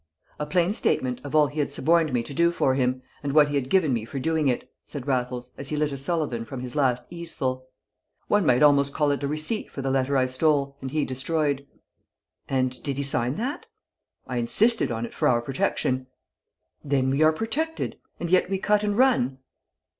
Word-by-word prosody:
"A 150 - -3
plain 175 +5 +2
statement 125 - 0
of 145 +1 -5
all 150 -1 +6
he 145 +2 -5
had 145 - 0
suborned 165 +1 +2
me 120 -2 0
to 130 - -9
do 170 +4 +3
for 135 -6 +1
him, 130 -1 0 0.2
and 140 -1 -3
what 150 -1 +6
he - - -4
had 135 -2 -1
given 160 -7 +3
me 115 -2 -1
for 120 +5 -7
doing 155 +2 0
it," 125 -2 -1 0.2
said 140 -4 -7
Raffles, 125 -2 -2
as 140 - -5
he 150 - -2
lit 150 -1 0
a - - -3
Sullivan 140 -5 -2
from 125 +2 -7
his 125 +1 -7
last 125 -4 +1
easeful. 135 -7 -3 0.6
"One 205 -1 +3
might 125 -1 +4
almost 140 -1 +4
call 150 -2 +2
it 140 - -1
a 140 - -1
receipt 155 +9 -2
for 135 - -6
the 135 - 0
letter 135 +1 +1
I 130 - +3
stole 140 +1 +1
and 130 - -4
he 150 +2 0
destroyed." 140 +1 -1 0.8
"And 130 -1 -1
did 140 -2 -3
he 140 - -1
sign 125 -1 +1
that?" 265 - -4 0.6
"I 125 - -4
insisted 215 - +3
on 115 0 -2
it - - -10
for - - +1
our 120 -2 +3
protection." 130 +1 -1 0.8
"Then 135 -2 +1
we 140 +3 0
are 155 0 +6
protected, 280 - -3 0.2
and 170 - -3
yet 185 0 +3
we 195 - 0
cut 210 +2 +2
and 205 0 0
run?" 235 - +3
140 Hz, 210 wpm, -25 LUFS, 130-160 Hz, 0.8 s, all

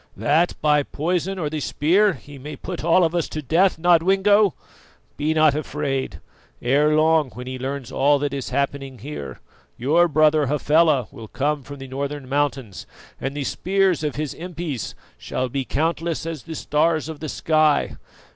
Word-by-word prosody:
"That 160 +4 +2
by 150 -1 +4
poison 175 +6 -2
or 165 -5 -2
the 155 +1 -3
spear 185 +8 +2
he 140 0 -12
may 150 +3 -7
put 180 -4 -6
all 170 +2 +4
of 165 0 +1
us 170 -2 -1
to 155 - -4
death, 170 +8 +3
Nodwengo! 190 +4 +4 0.6
Be 150 +2 -1
not 155 -2 +4
afraid; 140 - -3 0.4
ere 145 +5 +2
long 155 -2 +3
when 125 - -7
he 130 0 -6
learns 135 0 -5
all 145 +1 +3
that 140 0 -2
is 135 -2 -4
happening 135 0 -2
here, 100 - -8 0.4
your 160 +8 +3
brother 155 -1 +3
Hafela 150 -2 +3
will 115 -5 -10
come 145 +5 -1
from 140 +2 -10
the 135 -1 -9
northern 140 +1 -4
mountains, 135 -6 -2 0.3
and 135 +1 -4
the 145 - -2
spears 190 +1 +1
of 150 -3 -2
his 150 0 -3
impis 165 -7 -5 0.2
shall 130 0 -3
be 135 +1 -3
countless 165 +3 -1
as 165 -4 -5
the 160 -1 -8
stars 155 +1 +1
of 160 -2 -7
the 155 - -5
sky. 155 -1 +2
150 Hz, 170 wpm, -22 LUFS, 140-165 Hz, 0.6 s, by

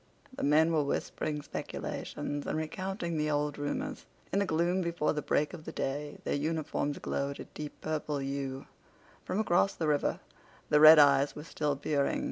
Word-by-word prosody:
The - - -5
men 155 +3 +4
were 155 - +3
whispering 150 +1 -2
speculations 145 0 -5
and - - -1
recounting 170 +1 -3
the 150 0 0
old 145 -1 -1
rumors. 260 - -3 0.3
In 200 - +3
the 200 - +1
gloom 175 +3 +1
before 170 -3 0
the 150 - -2
break 150 0 0
of 155 - -8
the - - -6
day 145 +2 -3
their - - -1
uniforms 150 -1 -1
glowed 140 0 -3
a - - -5
deep 150 -1 -8
purple 155 -1 -2
hue. 135 -1 -4 0.6
From 185 - -1
across 195 -2 +2
the 160 - -1
river 150 -1 +1 0.5
the 150 - +5
red 155 +1 +10
eyes 140 -1 +5
were 150 - -7
still 150 -2 -1
peering. 140 0 0
150 Hz, 175 wpm, -31 LUFS, 145-165 Hz, 0.6 s, red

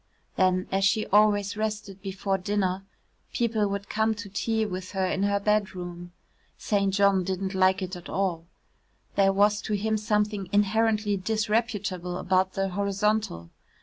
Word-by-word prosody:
Then 185 -1 +2
as 195 +1 +1
she 215 +2 +2
always 205 -1 +3
rested 210 -2 -4
before 195 0 -2
dinner, 190 -1 -1 0.5
people 225 -4 +1
would 200 0 -4
come 220 +1 +1
to 205 -1 -8
tea 220 +3 0
with 185 -1 -6
her 190 -1 0
in 190 +1 -1
her 200 0 +2
bedroom. 180 -4 -2 0.5
St. 200 -2 0
John 195 -1 +3
didn't 190 +1 -3
like 190 0 +3
it 185 +1 -5
at 175 - -10
all. 175 -4 -1 0.7
There 195 -1 +4
was 205 +1 +3
to 215 - -3
him 215 +2 0
something 210 -2 -1
inherently 210 0 +2
disreputable 205 -3 -1
about 185 0 +1
the 195 0 -1
horizontal. 200 - -1
200 Hz, 150 wpm, -27 LUFS, 190-210 Hz, 0.7 s, There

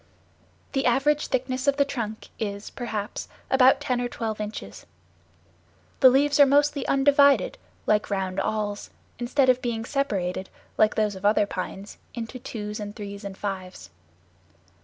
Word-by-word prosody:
The 270 -2 +1
average 290 +5 +2
thickness 255 +1 -2
of 280 0 +3
the 280 - +4
trunk 225 -6 -5
is, 200 -1 -4
perhaps, 215 -4 -4 0.2
about 265 0 +6
ten 250 -1 -1
or 245 - -2
twelve 220 -3 -4
inches. 210 0 -7 1.1
The 260 - +9
leaves 285 +3 +3
are 285 - +10
mostly 285 0 +2
undivided, 280 0 +4 0.3
like 210 0 +2
round 190 -1 -2
awls, 205 0 -2 0.3
instead 260 +3 +2
of 255 0 +4
being 230 -2 -2
separated, 195 -10 -2 0.3
like 215 0 +3
those 210 -2 +1
of 190 - -10
other 205 0 +4
pines, 195 +1 -6 0.2
into 235 +2 -6
twos 210 -3 -6
and 205 0 -6
threes 200 -1 -7
and 195 -1 -7
fives. 185 - -6
225 Hz, 145 wpm, -25 LUFS, 205-270 Hz, 1.1 s, are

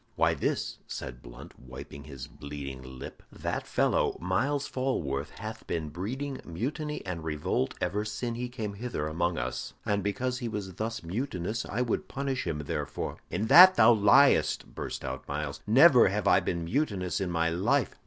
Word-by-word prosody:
"Why, - - +3
this," - - -2
said 65 -1 -6
Blunt, - - -12
wiping 65 +3 -10
his 70 -4 -8
bleeding 70 -2 -7 0.2
lip. - - -9
"That - - -4
fellow, - - +1
Myles 135 - 0
Falworth, 75 - -2
hath - - -7
been 80 -2 -2
breeding 130 - -4
mutiny 150 - -4
and 85 -4 -4
revolt 75 -4 -1
ever 105 +1 -1
sin 115 +3 -3
he 125 +1 -4
came 110 -5 -4
hither 100 -8 -3
among 85 +2 -1
us, - - -4
and 100 -1 +1
because 125 +6 -2
he 120 - -3
was 100 -4 -4
thus 110 +3 -4
mutinous 105 +2 -3
I 120 +4 -1
would 120 - -2
punish 135 -1 -3
him 75 -2 -2
therefor." - - -3
"In 100 +5 -1
that 185 +10 +10
thou 115 +2 +7
liest!" 110 +7 +4
burst - - -5
out - - -5
Myles. 70 0 -3
"Never 130 +2 +7
have 100 +1 -1
I - - +6
been 85 -1 -2
mutinous 100 - -1
in 95 - -1
my 85 -1 +1
life." 110 +9 +1
100 Hz, 170 wpm, -29 LUFS, 80-125 Hz, 0.2 s, that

